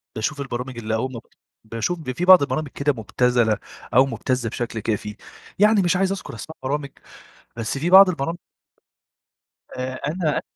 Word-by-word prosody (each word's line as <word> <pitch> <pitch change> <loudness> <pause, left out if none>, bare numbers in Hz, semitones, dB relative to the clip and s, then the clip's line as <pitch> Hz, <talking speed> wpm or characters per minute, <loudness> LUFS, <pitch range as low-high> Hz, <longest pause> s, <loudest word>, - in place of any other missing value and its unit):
باشوف 140 +7 -2
البرامج 125 -1 -5
اللي 110 -1 -2
أول 130 +4 -2
ما 115 - -6
ب - - -21 0.4
باشوف 115 +10 -3
ب 150 -5 -5
في 155 +8 -3
بعض 185 -2 +9
البرامج 150 +2 -1
كده 140 +2 -1
مبتذلة 120 -1 +1 0.4
أو 130 +3 +6
مبتزة 130 -3 -2
بشكل 115 0 -4
كافي، 105 -1 -3 0.4
يعني 210 0 +5
مش 175 -1 +2
عايز 190 +1 +1
أذكر 195 - -6
أسماء 160 - -9
برامج، 140 +1 -2 0.7
بس 115 +3 -3
في 160 +5 -1
بعض 190 +1 +9
البرامج 165 +1 -2 1.4
آآ، 130 0 -3
أنا 155 -1 -1
135 Hz, 165 wpm, -22 LUFS, 120-165 Hz, 1.4 s, بعض